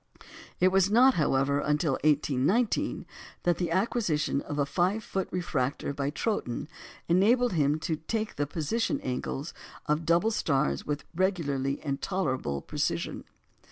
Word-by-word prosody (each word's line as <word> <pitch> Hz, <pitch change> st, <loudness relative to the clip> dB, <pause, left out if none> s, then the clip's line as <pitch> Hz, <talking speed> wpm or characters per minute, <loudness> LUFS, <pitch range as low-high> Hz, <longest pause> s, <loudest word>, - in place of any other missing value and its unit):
It 185 Hz, -, +5 dB
was 190 Hz, 0 st, +3 dB
not, 250 Hz, +5 st, +6 dB
however, 140 Hz, -, +2 dB
until 150 Hz, +1 st, +1 dB
1819 150 Hz, -, +1 dB, 0.4 s
that 175 Hz, -1 st, +1 dB
the 175 Hz, -2 st, 0 dB
acquisition 170 Hz, -, 0 dB
of 145 Hz, -, -6 dB
a 145 Hz, -, +2 dB
5 185 Hz, +9 st, 0 dB
foot 190 Hz, -2 st, -2 dB
refractor 145 Hz, -6 st, -2 dB
by 140 Hz, 0 st, -2 dB
Troughton 150 Hz, -, -2 dB, 0.4 s
enabled 225 Hz, +7 st, +3 dB
him 150 Hz, -2 st, +2 dB
to 160 Hz, 0 st, -1 dB
take 215 Hz, +7 st, -3 dB
the 145 Hz, -, -1 dB
position 165 Hz, +10 st, -1 dB
angles 135 Hz, +3 st, -4 dB, 0.3 s
of 150 Hz, +2 st, 0 dB
double 170 Hz, +7 st, +3 dB
stars 135 Hz, -, 0 dB
with 150 Hz, 0 st, -2 dB
regularity 145 Hz, -7 st, 0 dB
and 140 Hz, -1 st, -2 dB
tolerable 130 Hz, -, -2 dB
precision. -, -, -2 dB
160 Hz, 135 wpm, -28 LUFS, 140-190 Hz, 0.4 s, not